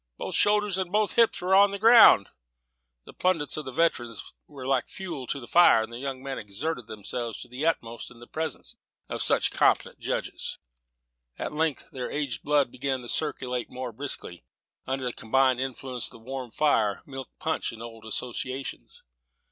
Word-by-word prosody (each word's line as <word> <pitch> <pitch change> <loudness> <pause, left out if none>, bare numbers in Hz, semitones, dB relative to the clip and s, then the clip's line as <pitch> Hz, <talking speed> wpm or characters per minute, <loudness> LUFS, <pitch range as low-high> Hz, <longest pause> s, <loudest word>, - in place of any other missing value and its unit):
Both - - -5
shoulders 205 -2 +3
and 185 -2 -2
both 210 0 +2
hips 230 -5 +3
on 190 +2 +6
the 200 - -4
ground." 220 - +8 0.8
The - - -12
plaudits 170 -6 0
of 155 - -4
the 130 - -5
veterans 120 -7 -1
were 140 -3 -9
like 135 -2 +1
fuel 165 -9 -6
to 140 - -2
the 125 - -9
fire. 120 -8 +6
The 120 +1 -9
young 135 -1 -5
men 135 -1 -4
exerted 115 +5 -4
themselves 110 +2 -4
to - - -8
the 130 +6 -2
utmost 115 -8 -2
in 120 - -15
the 120 - -11
presence 160 +5 -5 0.3
of - - -2
such - - +4
competent - - +2
judges. - - -3 0.8
At - - -4
length 155 -1 0
their 125 -2 -4
aged 140 -6 -2
blood 145 -4 +2
began 130 0 -2
to 120 - -7
circulate 125 -5 -2
more 125 -1 -5
briskly, 115 -8 -5 0.4
under 130 0 -2
the 125 - -1
combined 130 +2 +2
influence 130 -1 -3
of - - -8
the - - -11
warm 130 +2 -6
fire, 110 -7 +1
milk 135 -2 -8
punch, 160 0 -1
and 115 0 -9
old 115 -1 -10
associations. 125 +4 -5
130 Hz, 175 wpm, -27 LUFS, 120-160 Hz, 0.8 s, ground